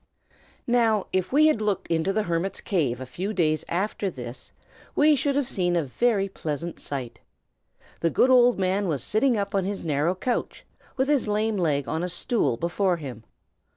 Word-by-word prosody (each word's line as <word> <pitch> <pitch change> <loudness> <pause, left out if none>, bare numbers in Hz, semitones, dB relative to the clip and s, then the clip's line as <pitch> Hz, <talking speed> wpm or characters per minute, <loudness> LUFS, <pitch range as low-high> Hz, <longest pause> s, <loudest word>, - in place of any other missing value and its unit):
NOW, 230 -4 +2
if 185 -1 0
we 300 +3 +5
had 305 -8 +3
looked 210 -3 0
into 165 +3 +1
the 215 +2 0
hermit's 170 +1 -2
cave 140 - -1
a 130 - -6
few 185 +11 -4
days 155 -5 +1
after 195 +2 -1
this, 125 -5 -9 0.4
we 300 0 +5
should 280 0 0
have 285 -3 +1
seen 175 -5 0
a 170 - +2
very 200 - +1
pleasant 165 -2 -5
sight. 130 -4 -6 0.8
The 165 - +1
good 255 +9 +3
old 245 -1 +6
man 190 +1 0
was 145 -7 -1
sitting 235 +2 +2
up 200 -1 -2
on 195 -1 +1
his 195 -1 -4
narrow 155 +4 +1
couch, 245 +6 -3 0.3
with 265 +1 +1
his 285 -6 +2
lame 215 +1 0
leg 145 -6 0
on 160 - -2
a 180 - -2
stool 175 - 0
before 175 - 0
him. 130 -8 -8
190 Hz, 185 wpm, -25 LUFS, 160-220 Hz, 0.8 s, old